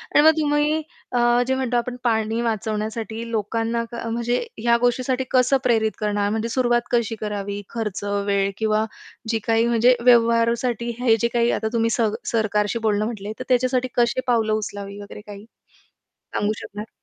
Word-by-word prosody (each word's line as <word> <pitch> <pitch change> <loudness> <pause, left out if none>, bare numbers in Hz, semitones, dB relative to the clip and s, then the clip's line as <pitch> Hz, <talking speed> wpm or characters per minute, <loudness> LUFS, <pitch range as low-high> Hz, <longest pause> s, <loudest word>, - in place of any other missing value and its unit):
आणि - - +8
मग 320 - +9
तुम्ही 300 +1 +1 0.3
अ, 245 - +1 0.3
जे 265 - +1
म्हणतो 255 -2 0
आपण 245 +1 -2
पाणी 225 -1 +1
वाचवण्यासाठी 220 0 -3
लोकांना 225 +2 -1
क 235 - -7
म्हणजे 235 +1 -1 0.2
ह्या 235 +1 +3
गोष्टीसाठी 255 +1 +1
कसं 255 +1 +4
प्रेरित 225 -4 +2
करणार. 205 -1 0
म्हणजे 225 +1 -1
सुरुवात 240 0 +2
कशी 235 -2 +1
करावी 205 -1 -3
खर्च, 210 -4 -4 0.2
वेळ 200 -1 +1
किंवा 215 0 +1 0.4
जी 225 - +1
काही 225 0 +3
म्हणजे 235 +2 +4
व्यवहारासाठी 235 0 +3
हे 235 -3 +4
जे 235 - +3
काही 235 0 +2
आता 220 - -1
तुम्ही 230 0 +2
सर 225 -3 +2 0.2
सरकारशी 215 0 0
बोलणं 210 0 +1
म्हटले, 215 -2 -5
तर - - -3
त्याच्यासाठी 255 0 +2
कशी 240 +1 +2
पावलं 225 -3 +2
उचलावी 205 -1 -4
वगैरे 205 +1 -10
काही 205 0 -9 0.7
सांगू 205 +1 -3
शकणार? 210 +2 -8
230 Hz, 160 wpm, -22 LUFS, 215-240 Hz, 0.7 s, मग